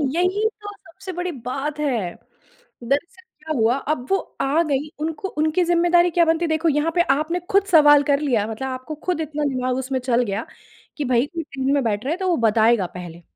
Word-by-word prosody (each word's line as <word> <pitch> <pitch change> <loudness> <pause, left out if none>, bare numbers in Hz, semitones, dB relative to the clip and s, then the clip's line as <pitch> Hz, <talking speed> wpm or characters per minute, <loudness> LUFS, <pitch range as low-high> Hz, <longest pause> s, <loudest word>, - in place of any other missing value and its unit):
यही 375 +5 +1
तो 410 - -7
सबसे 385 +1 -11
बड़ी 355 0 -3
बात 275 +3 -4
है। 235 -12 -1 0.7
दरअसल 285 +9 -2 0.2
क्या 310 0 -4
हुआ, 225 +3 +3
अब 275 -2 -3
वो 390 - +3 0.2
आ 290 +5 +2
गईं 295 -2 -1 0.2
उनको 325 +4 -3
उनकी 315 +2 0
ज़िम्मेदारी 345 +1 +3
क्या 340 0 +3
बनती? 325 +1 +1
देखो 315 +1 +1
यहाँ 295 +2 +1
पे 345 - +4
आपने 315 +5 -2
खुद 395 0 +4
सवाल 295 -5 +6
कर 280 0 +3
लिया, 245 -8 +1
मतलब 225 +4 -4
आपको 255 +3 -6
खुद 360 -3 0
इतना 300 -1 -3
दिमाग 255 0 -1
उसमें 265 0 -2
चल 245 -1 +1
गया 205 +1 -3 0.5
कि 295 - -2
भई 250 0 +2
कोई 335 +2 -5
ट्रेन 270 0 -1
में 285 - +2
बैठ 215 0 -1
रहा 280 - -1
है 340 - -3
तो 380 -1 -1
वो 350 - +2
बताएगा 220 -2 +3
पहले। 175 -1 -9
295 Hz, 205 wpm, -22 LUFS, 255-340 Hz, 0.7 s, सवाल